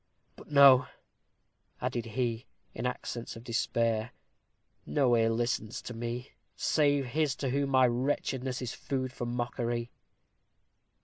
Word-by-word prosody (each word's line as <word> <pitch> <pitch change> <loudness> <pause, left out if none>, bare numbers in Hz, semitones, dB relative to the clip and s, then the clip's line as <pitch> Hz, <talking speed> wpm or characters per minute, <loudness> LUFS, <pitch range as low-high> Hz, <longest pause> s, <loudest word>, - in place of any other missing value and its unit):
But - - -14
no," 140 -3 +7 0.9
added 125 -2 -2
he, 115 +1 -2 0.3
in - - -2
accents 120 -1 -5
of 115 - -10
despair, 115 -1 0 0.7
"no 130 -4 +2
ear 115 -1 +3
listens 115 -1 -1
to 125 - -6
me, 120 +2 -5 0.2
save 145 -3 +2
his 145 +1 0
to 135 -3 -2
whom 140 +1 0
my 130 -1 +5
wretchedness 130 +1 -1
is 125 - -4
food 130 -2 -3
for 120 - -4
mockery." 120 0 -2
125 Hz, 125 wpm, -30 LUFS, 120-130 Hz, 0.9 s, no